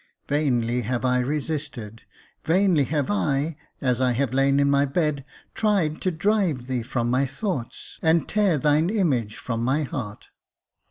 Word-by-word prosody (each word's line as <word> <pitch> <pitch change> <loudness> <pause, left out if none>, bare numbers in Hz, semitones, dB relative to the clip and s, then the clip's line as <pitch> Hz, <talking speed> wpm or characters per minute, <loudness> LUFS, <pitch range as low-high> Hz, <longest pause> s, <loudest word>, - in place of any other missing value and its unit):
Vainly 125 -5 +1
have 125 +2 -2
I 125 0 +2
resisted 135 -5 -4 0.2
— - - -34
vainly 175 -4 +3
have 145 -3 -1
I, 140 - 0 0.3
as 125 -2 +1
I 125 -1 +3
have 130 0 -1
lain 135 +1 +3
in 140 - +3
my 140 0 +3
bed, 145 0 0 0.3
tried 195 -8 +1
to 185 - +1
drive 180 - 0
thee 130 -1 -2
from 120 0 -2
my 135 +2 +2
thoughts, 135 - -5
and 160 -2 +2
tear 205 -6 +2
thine 150 +4 +2
image 140 - 0
from 115 -2 -3
my 135 +5 +1
heart. 125 -8 -6
140 Hz, 160 wpm, -24 LUFS, 125-160 Hz, 0.3 s, vainly